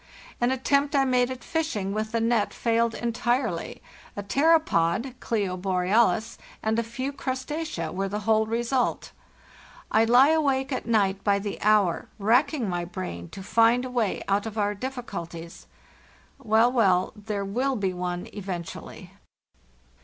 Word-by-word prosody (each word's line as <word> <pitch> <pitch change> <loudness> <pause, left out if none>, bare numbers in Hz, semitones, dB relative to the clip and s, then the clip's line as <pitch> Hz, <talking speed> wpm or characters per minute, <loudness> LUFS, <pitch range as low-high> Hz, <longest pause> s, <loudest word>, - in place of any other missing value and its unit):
An 240 - +3
attempt 280 +2 +1
I 275 -1 +4
made 250 -1 +2
at 260 -1 -7
fishing 220 -12 -2
with 215 +1 -2
the 230 - 0
net 225 -2 +1
failed 230 0 +1
entirely—a 235 -4 -3
pteropod 260 - +2
(Clo 200 -5 -1
borealis) 190 +4 +1 0.2
and 220 +1 +1
a - - 0
few 255 +5 -4
crustacea 260 - -4
were 195 +1 -2
the 210 +2 -3
whole 220 +1 +2
result. 235 +3 -1 0.8
I 220 +1 +4
le 255 +6 +6
awake 275 -3 +1
at 255 - -3
night 200 -4 +1
by 200 -1 +3
the 200 0 -5
hour 210 -4 +2
racking 240 +4 +2
my 175 -2 -2
brain 175 - -6
to 195 - -9
find 230 +4 +3
a 255 - -6
way 235 -5 -1
out 200 +2 +1
of 220 0 -7
our 205 -1 +1
difficulties. 175 -9 -7 0.7
Well, 230 -1 +3
well, 190 -7 +2
there 210 -1 -4
will 255 +7 0
be 195 -4 -1
one 180 0 -4
eventually! 185 -4 -7
225 Hz, 145 wpm, -26 LUFS, 195-250 Hz, 0.8 s, le